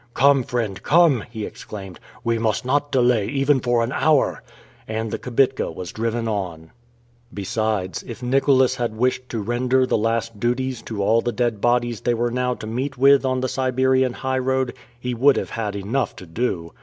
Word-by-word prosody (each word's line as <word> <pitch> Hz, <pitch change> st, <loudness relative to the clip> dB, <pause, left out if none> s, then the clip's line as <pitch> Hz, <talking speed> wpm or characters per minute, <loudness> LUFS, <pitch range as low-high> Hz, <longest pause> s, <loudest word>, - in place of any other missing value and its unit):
"Come, 140 Hz, +1 st, +5 dB
friend, 110 Hz, -6 st, -3 dB
come!" 155 Hz, -8 st, +4 dB
he 110 Hz, -3 st, -5 dB
exclaimed, 95 Hz, -4 st, -9 dB, 0.2 s
"we 115 Hz, -1 st, 0 dB
must 110 Hz, +2 st, 0 dB
not 145 Hz, +2 st, 0 dB
delay, 120 Hz, -5 st, +3 dB
even 135 Hz, 0 st, +2 dB
for 120 Hz, -1 st, +1 dB
an 115 Hz, -, -2 dB
hour!" 155 Hz, 0 st, +2 dB, 0.5 s
And 110 Hz, 0 st, -3 dB
the -, -, -3 dB
kibitka 135 Hz, 0 st, +1 dB
was 90 Hz, -, -7 dB
driven 115 Hz, +1 st, -2 dB
on. 90 Hz, -7 st, -4 dB, 0.6 s
Besides, 105 Hz, -2 st, -2 dB
if 120 Hz, +1 st, -8 dB
Nicholas 130 Hz, 0 st, +3 dB
had 120 Hz, -3 st, -2 dB
wished 125 Hz, +1 st, 0 dB
to 115 Hz, -, -3 dB
render 125 Hz, +3 st, +1 dB
the 120 Hz, -, +1 dB
last 115 Hz, 0 st, -1 dB
duties 125 Hz, +2 st, -1 dB
to 105 Hz, -3 st, -2 dB
all 115 Hz, +3 st, +3 dB
the 120 Hz, -, -1 dB
dead 120 Hz, -4 st, -1 dB
bodies 120 Hz, -2 st, +1 dB
they 120 Hz, -, +1 dB
were 120 Hz, +1 st, 0 dB
now 125 Hz, 0 st, 0 dB
to -, -, -9 dB
meet 130 Hz, +4 st, -3 dB
with 140 Hz, +2 st, +5 dB
on 130 Hz, -1 st, 0 dB
the 130 Hz, -, 0 dB
Siberian 130 Hz, 0 st, +1 dB
highroad, 130 Hz, 0 st, -1 dB, 0.3 s
he 125 Hz, 0 st, -3 dB
would 135 Hz, +4 st, +4 dB
have -, -, -3 dB
had 105 Hz, -3 st, -3 dB
enough 110 Hz, +7 st, -2 dB
to 95 Hz, -, -10 dB
do! 85 Hz, -2 st, -3 dB
120 Hz, 180 wpm, -22 LUFS, 110-130 Hz, 0.6 s, Come